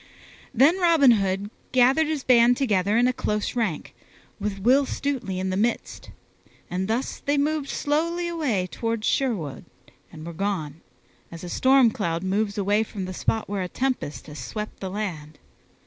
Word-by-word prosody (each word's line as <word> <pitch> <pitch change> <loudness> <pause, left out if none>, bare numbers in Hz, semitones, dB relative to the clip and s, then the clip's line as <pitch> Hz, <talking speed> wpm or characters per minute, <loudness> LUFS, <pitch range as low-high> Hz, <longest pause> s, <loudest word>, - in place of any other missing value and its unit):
Then 280 +9 +4
Robin 330 -7 +5
Hood 195 -1 0 0.2
gathered 265 +5 +4
his 305 -4 -2
band 245 -1 +5
together 205 -5 +1
in 245 +1 +4
a 255 - +1
close 210 -2 -2
rank, 220 -10 -2 0.5
with 200 -1 -3
Will 260 +7 +3
Stutely 255 -10 -3
in 190 0 -2
the - - -1
midst, 225 +5 -2 0.6
and 185 +1 -2
thus 230 +5 -2
they 285 +1 0
moved 295 0 0
slowly 335 +4 -1
away 290 - -1
toward 230 +3 -3
Sherwood, 205 - -1 0.5
and 155 0 -10
were 170 - -6
gone, 165 -5 -3 0.5
as 170 0 -9
a 175 - -6
storm 260 +2 +4
cloud 170 -5 -2
moves 200 +2 -1
away 205 +2 +2
from 205 -3 -5
the 185 - -6
spot 220 +4 -1
where 200 -1 -3
a 180 - -2
tempest 255 - -3
has 150 -1 -9
swept 210 - -6
the 190 - -4
land. 170 -7 -5
215 Hz, 165 wpm, -24 LUFS, 185-265 Hz, 0.6 s, Robin